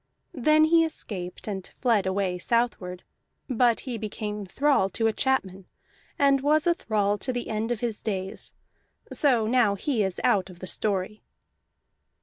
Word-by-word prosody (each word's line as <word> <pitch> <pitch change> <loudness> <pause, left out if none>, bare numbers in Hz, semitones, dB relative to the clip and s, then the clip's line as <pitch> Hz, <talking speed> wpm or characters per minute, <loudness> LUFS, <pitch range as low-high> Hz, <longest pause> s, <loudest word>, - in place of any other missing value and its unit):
Then 305 +4 +4
he 330 +1 +5
escaped, 195 - -5
and 195 -3 -4
fled 225 -7 +1
away 190 -1 -1
southward; 185 -5 -1 0.4
but 240 -2 +2
he 245 -4 -5
became 210 -1 -5
thrall 270 -1 +2
to 225 - -2
a 225 - +3
chapman, 195 -8 -1 0.5
and 275 -1 +4
was 300 +2 +2
a 345 - +4
thrall 205 - 0
to 260 - -2
the 245 -1 -4
end 220 +2 -2
of 235 - -2
his 230 -3 -3
days. 190 -3 -4 0.6
So 250 -7 +3
now 225 -3 +3
he 235 +3 -1
is 190 -3 -1
out 190 -2 +2
of 180 - -12
the 185 - -8
story. 200 +1 -2
220 Hz, 155 wpm, -26 LUFS, 195-255 Hz, 0.6 s, he